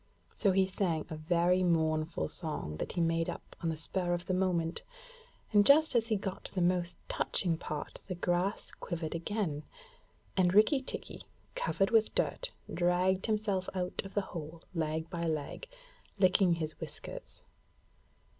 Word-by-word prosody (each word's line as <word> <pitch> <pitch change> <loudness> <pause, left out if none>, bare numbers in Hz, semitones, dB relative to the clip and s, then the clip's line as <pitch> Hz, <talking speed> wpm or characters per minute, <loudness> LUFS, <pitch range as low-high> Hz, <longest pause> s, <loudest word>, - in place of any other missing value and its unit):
So 200 - +3
he 190 0 +4
sang 180 -4 -1
a - - -2
very 175 +3 +2
mournful 160 -2 +1
song 150 - -3
that - - -4
he - - -2
made 165 0 +1
up - - -7
on 165 - 0
the 160 - -2
spur 175 +2 +1
of 175 - -6
the 185 - -1
minute, 175 -3 +1 0.7
and 205 -1 +7
just 300 +7 +6
as 230 -2 +2
he 220 - +2
got 195 -1 -4
to - - -9
the - - +1
most 175 0 +1
touching 175 -4 +1
part 155 -1 -5
the 185 - -3
grass 175 +3 0
quivered 165 -3 -4
again, 170 -3 -2 0.7
and 185 -1 +3
Rikki 215 +7 +6
tikki, 265 - -6 0.3
covered 485 - +1
with 225 -1 +3
dirt, - - 0 0.2
dragged 180 +2 +2
himself 210 -4 0
out 180 -1 -1
of 195 - -10
the 205 - +3
hole 165 0 -7
leg 160 -1 -1
by 170 -2 -3
leg, 160 - -2 0.5
licking 185 -1 +5
his 160 -2 -3
whiskers. - - -6
180 Hz, 160 wpm, -32 LUFS, 165-195 Hz, 0.7 s, and